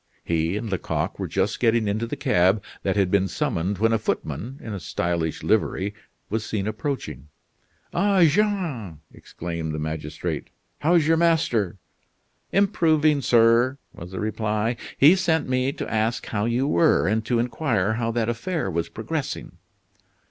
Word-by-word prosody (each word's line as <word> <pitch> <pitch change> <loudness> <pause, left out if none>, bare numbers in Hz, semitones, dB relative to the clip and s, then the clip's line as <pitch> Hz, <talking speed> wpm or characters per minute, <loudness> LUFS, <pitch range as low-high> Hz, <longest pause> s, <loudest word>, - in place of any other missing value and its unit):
He 85 +3 0
and 110 - -4
Lecoq 95 - -2
were - - -2
just 95 +2 -1
getting 115 -2 +2
into 110 +3 -1
the - - -4
cab 95 +4 +2 0.2
that 95 - 0
had 95 -3 +2
been 95 -1 +3
summoned 95 +2 -1
when 115 +3 +2
a 115 - +2
footman 110 - -3
in 110 - -7
a 100 - -4
stylish 85 -1 -2
livery 100 +2 +1 0.3
was 110 +1 -2
seen 105 -3 -2
approaching. 110 - -4 0.7
"Ah! 195 -3 +3
Jean," 160 - 0
exclaimed 80 -2 -5
the - - -3
magistrate, 75 +1 -4 0.3
"how's 165 0 +3
your 165 +1 +3
master?" 155 - +2 0.7
"Improving, 155 -6 +3
sir," 120 +2 +4 0.2
was 85 - -9
the 95 - -6
reply. 110 +1 -1 0.2
"He 150 +7 +7
sent 165 -5 +1
me 130 +1 +1
to - - -5
ask 110 +2 0
how 105 -1 -1
you 120 +3 +1
were, 155 - +3
and 110 +3 +1
to 120 +1 +1
inquire 115 -4 0
how 115 0 -1
that 115 -1 0
affair 120 - -2
was 85 0 -2
progressing?" - - -5
110 Hz, 155 wpm, -24 LUFS, 95-135 Hz, 0.7 s, He